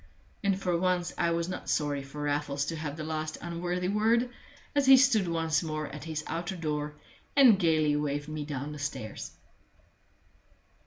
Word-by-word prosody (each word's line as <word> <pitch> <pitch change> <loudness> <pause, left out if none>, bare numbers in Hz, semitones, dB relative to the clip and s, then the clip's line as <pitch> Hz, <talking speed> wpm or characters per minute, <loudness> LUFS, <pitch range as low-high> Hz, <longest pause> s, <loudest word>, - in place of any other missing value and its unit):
And 195 -1 +2
for 180 -2 0
once 180 -1 0
I 170 - +1
was 170 0 0
not 185 - -5
sorry 145 -2 0
for 140 +2 -7
Raffles 145 -1 -1
to 165 - -3
have 155 -1 -5
the 155 - -4
last 155 0 -3
unworthy 175 +1 -2
word, 225 +5 +2 0.4
as 285 -2 +2
he 265 0 +10
stood 245 -7 +4
once 165 -1 +1
more 155 -2 -3
at 150 +2 -8
his 155 -2 -3
outer 175 +3 -3
door 150 -3 -3 0.4
and 250 -8 +7
gayly 155 -4 +3
waved 145 0 -1
me 155 -1 -4
down 145 0 -4
the 150 - -7
stairs. 145 -7 -5
160 Hz, 170 wpm, -29 LUFS, 150-180 Hz, 0.4 s, he